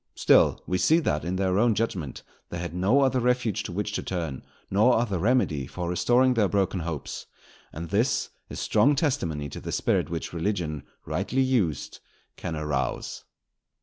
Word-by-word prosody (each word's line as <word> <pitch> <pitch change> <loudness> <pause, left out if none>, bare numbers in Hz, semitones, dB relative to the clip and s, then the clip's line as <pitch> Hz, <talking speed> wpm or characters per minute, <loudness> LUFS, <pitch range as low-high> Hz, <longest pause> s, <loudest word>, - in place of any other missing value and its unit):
Still - - +4
we 90 0 -1
see 160 - +4
that, 75 - 0
in 90 +2 -2
their 95 0 +1
own 115 -1 +3
judgment, 95 - -3 0.3
they 85 - -5
had 85 -1 -5
no 100 +10 +3
other 130 -1 +3
refuge 125 -3 +1
to 105 - -6
which 105 +3 -2
to - - -2
turn, 80 -8 -4 0.3
nor 110 +6 +4
other 105 -6 0
remedy 95 - +1
for 90 -1 -5
restoring 120 +9 +3
their 110 -4 +3
broken 95 -1 0
hopes; 80 -4 -5 0.4
and 80 +1 -7
this 115 +7 +1 0.2
is - - -6
strong 125 +7 +3
testimony 95 - -1
to - - -7
the - - -5
spirit - - +1
which 85 0 -4
religion 85 -4 -2 0.2
rightly 135 +2 0
used 110 - 0 0.4
can 85 -3 -5
arouse. 75 -4 -3
95 Hz, 170 wpm, -26 LUFS, 85-120 Hz, 0.4 s, Still